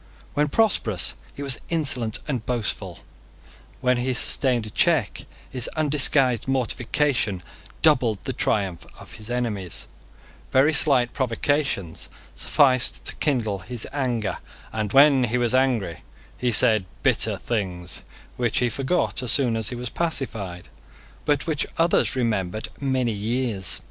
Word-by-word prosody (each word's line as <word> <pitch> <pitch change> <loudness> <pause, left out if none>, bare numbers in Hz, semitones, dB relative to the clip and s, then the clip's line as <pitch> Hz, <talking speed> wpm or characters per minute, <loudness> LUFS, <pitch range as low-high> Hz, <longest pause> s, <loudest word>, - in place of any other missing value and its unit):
When 150 +1 +2
prosperous, 140 - +1 0.2
he 140 - -8
was 135 -4 +2
insolent 130 -9 +1
and 130 -6 -2
boastful: 120 -3 -2 0.8
when 125 -1 +2
he 125 +1 -1
sustained 120 -1 +2
a 110 - -9
check, - - +1 0.2
his 125 -2 0
undisguised 140 -5 +1
mortification 125 - 0 0.4
doubled 125 -9 +4
the - - -2
triumph 95 -5 -1
of - - -13
his 110 +1 -8
enemies: 110 -7 -3 0.6
very 140 +4 +4
slight 130 -6 +4
provocations 130 - -1 0.3
sufficed 130 -3 +2
to - - -2
kindle 115 -9 0
his 115 +5 -4
anger; 120 -7 -1 0.3
and 110 -2 -2
when 135 -1 +6
he 120 +1 -1
was 120 -1 +2
angry 125 -10 +1 0.3
he 125 -1 -1
said 110 -2 +4 0.2
bitter - - +2
things 90 -7 -4 0.4
which 120 -2 0
he 125 - +2
forgot 135 +7 0
as 125 -3 +1
soon 125 -5 +3
as 110 -2 -1
he 125 - -5
was 120 -1 -5
pacified, 115 - -3 0.6
but 145 -1 +1
which 155 -3 -1
others 165 -2 +2
remembered 110 -5 -1
many 130 -3 0
years. 110 -2 0
125 Hz, 135 wpm, -24 LUFS, 110-135 Hz, 0.8 s, when